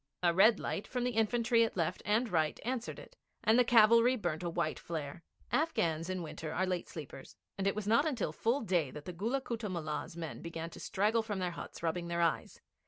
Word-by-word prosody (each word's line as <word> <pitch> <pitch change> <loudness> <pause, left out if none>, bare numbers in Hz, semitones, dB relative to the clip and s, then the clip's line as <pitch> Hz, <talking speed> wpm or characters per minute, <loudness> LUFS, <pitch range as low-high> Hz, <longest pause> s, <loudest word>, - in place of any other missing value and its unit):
A 170 -1 +4
red 205 +4 +6
light 200 - -3
from 250 -1 -2
the 250 - 0
infantry 230 +1 +3
at 225 - -2
left 165 -3 -1
and 220 +5 +2
right 160 -6 0
answered 245 -1 -3
it, - - -12 0.3
and 225 +3 +5
the - - +7
cavalry 235 +1 +6
burnt 175 -9 -2
a 175 - -2
white 165 -2 -1
flare. 160 -1 -5 0.3
Afghans 170 - 0
in 185 -1 -2
winter 155 0 -6
are 185 - 0
late 180 -2 -2
sleepers, 145 -4 -9 0.2
and 195 0 -1
it 200 - +1
was 215 -1 -3
not 250 +6 +3
till - - -1
full 240 +5 +1
day 175 -9 +1
that 150 +3 -9
the 180 - -5
Gulla 230 +10 -1
Kutta 230 -4 -4
Mullah's 160 -2 -4
men 165 -2 -6
began 165 0 -6
to - - -10
straggle 210 +4 +1
from 215 -2 -4
their 180 -2 -1
huts, 170 - -9
rubbing 170 +1 -1
their 170 0 -1
eyes. 165 -3 0
190 Hz, 220 wpm, -33 LUFS, 170-230 Hz, 0.3 s, the